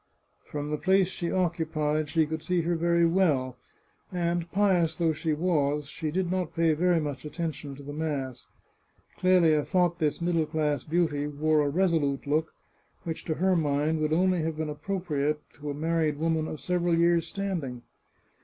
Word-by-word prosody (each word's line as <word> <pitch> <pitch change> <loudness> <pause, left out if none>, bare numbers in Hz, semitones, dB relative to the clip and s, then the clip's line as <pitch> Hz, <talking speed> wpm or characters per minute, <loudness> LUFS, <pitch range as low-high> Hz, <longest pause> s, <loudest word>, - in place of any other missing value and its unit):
From 145 0 -4
the 150 - -1
place 190 -1 +3
she 175 -2 -4
occu 170 -3 0
pied 150 -1 0
she 160 +1 +2
could 160 +1 -4
see 175 +2 0
her 170 +1 0
very 170 +1 +3
well, 150 -8 +2 0.5
and, 170 -1 -1
pious 180 -5 +2
though 165 -2 +2
she 155 +1 -2
was, 150 -3 +1
she 155 +2 -4
did 180 +2 -1
not 185 -1 -2
pay 165 -1 +3
very 175 +2 +2
much 145 -3 -4
attention 150 -2 -5
to 140 - -11
the 145 +1 -7
mass. 140 -5 -3 0.7
Clelia 170 -5 +4
thought 175 -1 +1
this 150 -3 0
middle 170 -2 +1
class 150 -4 -1
beauty 155 -3 0
wore 150 +1 +1
a 145 - +1
resolute 155 -5 +1
look, 155 +3 0 0.5
which 165 -1 -5
to 160 - -1
her 185 +3 +2
mind 150 0 +1
would 155 0 0
only 180 +1 +2
have 160 0 -2
been 155 -1 -2
appropriate 150 -2 -2 0.2
in 150 - -4
a - - -2
mar 165 +3 -1
ried 155 -2 +1
woman 160 0 0
of 155 - -6
several 175 -1 +1
years' 170 0 +3
standing. 160 -12 -4
160 Hz, 180 wpm, -28 LUFS, 150-175 Hz, 0.7 s, Clelia